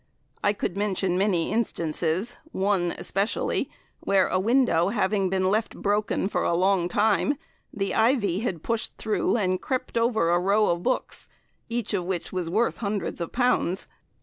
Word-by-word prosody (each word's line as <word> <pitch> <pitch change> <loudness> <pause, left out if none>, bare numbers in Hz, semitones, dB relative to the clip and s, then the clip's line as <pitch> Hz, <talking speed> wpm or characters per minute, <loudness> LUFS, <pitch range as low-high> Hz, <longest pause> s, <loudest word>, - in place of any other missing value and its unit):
I 205 - +3
could 195 -3 -3
mention 195 -3 0
many 185 -3 +1
instances, 180 0 -1 0.2
one 190 -3 0
especially, 200 +3 -1 0.3
where 195 -2 +2
a 185 - +1
window 215 -5 +3
having 195 -2 +1
been 190 0 +1
left 215 +2 0
broken 205 -1 0
for - - -1
a 170 - +1
long 185 0 +2
time, 210 +9 +2 0.4
the 195 -2 -2
ivy 220 -7 +2
had 185 -8 -3
pushed 230 0 -2
through 220 +1 0
and 185 -4 0
crept 255 -3 -2
over 220 -7 +2
a 175 - +3
row 200 +3 +3
of 170 0 -1
books, 255 +6 -2 0.4
each 235 -2 -2
of 185 -3 0
which 180 -1 -3
was 180 -3 -2
worth 220 +7 +1
hundreds 200 -5 -3
of 170 - -3
pounds. 245 -7 +1
195 Hz, 160 wpm, -26 LUFS, 180-220 Hz, 0.4 s, I